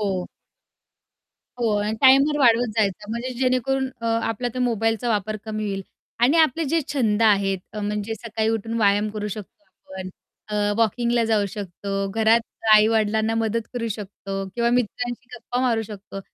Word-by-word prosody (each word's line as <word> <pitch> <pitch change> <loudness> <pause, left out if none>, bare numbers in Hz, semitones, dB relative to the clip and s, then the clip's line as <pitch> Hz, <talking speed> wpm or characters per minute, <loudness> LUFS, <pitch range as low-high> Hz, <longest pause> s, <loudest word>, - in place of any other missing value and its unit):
हो. 190 -3 -1 1.3
हो. 230 -3 +1
आणि 210 +1 -1
टाइमर 275 +3 +6
वाढवत 240 -2 +4
जायचा. 210 -1 0
म्हणजे 235 +3 -3
जेणेकरून 265 +1 +1
अ, 230 - -3
आपला 230 +1 0
त्या 255 - -4
मोबाईलचा 225 0 0
वापर 215 -1 0
कमी 215 -1 -3
होईल. 195 -1 -3 0.4
आणि 260 +7 +4
आपले 320 +1 +3
जे 330 - +3
छंद 225 -6 +1
आहेत, 200 -3 +3
अ, 210 - -5
म्हणजे 210 +1 -2
सकाळी 220 0 -2
उठून 225 0 -2
व्यायाम 205 0 +3
करू 210 0 -4
शकतो 215 +9 -9
आपण. 190 0 -10 0.4
अ, 205 -1 0
वॉकिंगला 235 +1 +2
जाऊ 215 -2 +2
शकतो. 195 0 -4
घरात 225 +1 +4 0.3
आई-वडिलांना 220 0 +3
मदत 225 0 -1
करू 235 -2 -2
शकतो. 195 -1 -5
किंवा 235 0 +1
मित्रांशी 245 +1 -1
गप्पा 245 +1 -3
मारू 235 -3 +1
शकतो. 200 -2 -9
220 Hz, 155 wpm, -23 LUFS, 205-240 Hz, 1.3 s, टाइमर